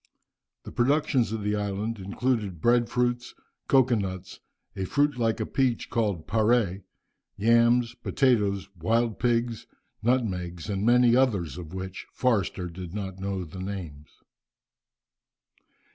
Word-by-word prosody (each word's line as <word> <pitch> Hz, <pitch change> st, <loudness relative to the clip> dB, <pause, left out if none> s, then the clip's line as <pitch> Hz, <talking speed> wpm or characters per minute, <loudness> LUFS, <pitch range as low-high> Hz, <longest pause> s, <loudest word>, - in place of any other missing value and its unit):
The -, -, -9 dB
productions 130 Hz, -3 st, +2 dB
of 110 Hz, -2 st, -3 dB
the 105 Hz, +1 st, 0 dB
island 105 Hz, +2 st, -3 dB
included 100 Hz, -1 st, -2 dB
bread 120 Hz, +4 st, +3 dB
fruits, 120 Hz, 0 st, -1 dB, 0.3 s
cocoa 130 Hz, -2 st, +4 dB
nuts, 95 Hz, -4 st, -3 dB, 0.4 s
a 95 Hz, -, -2 dB
fruit 145 Hz, +7 st, +1 dB
like 115 Hz, -2 st, 0 dB
a -, -, -1 dB
peach, 130 Hz, -3 st, 0 dB
called 105 Hz, -9 st, -1 dB
"parre," 110 Hz, -3 st, +2 dB, 0.6 s
yams, 115 Hz, +2 st, +3 dB
potatoes, 105 Hz, -9 st, +1 dB
wild 115 Hz, +6 st, 0 dB
pigs, 120 Hz, -1 st, 0 dB, 0.3 s
nutmegs, 95 Hz, -8 st, -1 dB
and 100 Hz, 0 st, -2 dB
many 120 Hz, +1 st, +5 dB
others 110 Hz, -, +1 dB
of 90 Hz, 0 st, -8 dB
which 95 Hz, 0 st, -6 dB
Forster 100 Hz, -7 st, 0 dB
did 90 Hz, +1 st, -8 dB
not 95 Hz, -2 st, -5 dB
know 95 Hz, -1 st, -3 dB
the 90 Hz, +3 st, -9 dB
names. 85 Hz, -7 st, -6 dB
105 Hz, 125 wpm, -27 LUFS, 95-120 Hz, 0.6 s, many